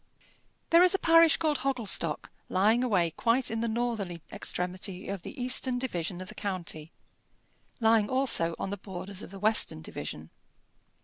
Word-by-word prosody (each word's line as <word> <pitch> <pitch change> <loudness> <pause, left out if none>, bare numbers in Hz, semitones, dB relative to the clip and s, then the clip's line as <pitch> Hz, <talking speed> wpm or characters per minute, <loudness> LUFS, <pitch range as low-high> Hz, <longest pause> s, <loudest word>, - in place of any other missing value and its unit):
There 335 +1 +7
is 365 +1 +5
a - - +3
parish 330 -2 +5
called 310 -4 0
Hogglestock 235 - 0 0.2
lying 215 +6 +3
away 185 -9 +2
quite 235 +9 +1
in 225 - -2
the 235 - 0
northern 220 -6 -2
extremity 180 +1 -3
of 195 -2 -4
the - - -9
eastern 255 0 +2
division 180 -8 -3
of 185 - -8
the - - -9
county 175 -5 -5 0.9
lying 225 -2 +3
also 250 -11 +1
on 195 - -4
the 205 - -3
borders 190 0 -6
of - - -9
the 195 - -10
western 210 - +1
division. 80 0 -7
210 Hz, 160 wpm, -29 LUFS, 180-250 Hz, 0.9 s, There